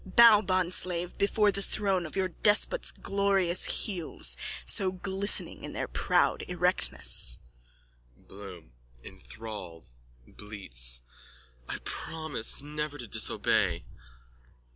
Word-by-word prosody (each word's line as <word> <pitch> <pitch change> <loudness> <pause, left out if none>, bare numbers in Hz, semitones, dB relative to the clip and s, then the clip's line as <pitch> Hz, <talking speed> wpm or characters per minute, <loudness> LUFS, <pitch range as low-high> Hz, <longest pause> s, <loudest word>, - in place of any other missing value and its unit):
Bow, 215 +2 +6
bondslave, 180 -2 +1
before 205 +1 +2
the 200 - -3
throne 195 -4 -1
of - - -11
your 190 -1 -1
despot's 210 - +2
glorious 195 -3 +2
heels 165 - -3 0.3
so 185 - +1
glistening 190 +2 -3
in - - -8
their - - -4
proud - - 0
erectness. 175 - +1 0.8
BLOOM: 95 -9 -13 0.3
(Enthralled, 85 - -11 0.3
bleats.) - - 0 0.7
I - - -3
promise 155 -6 -1
never 150 0 -5
to 120 - -8
disobey. 110 0 +1
170 Hz, 100 wpm, -28 LUFS, -, 0.8 s, Bow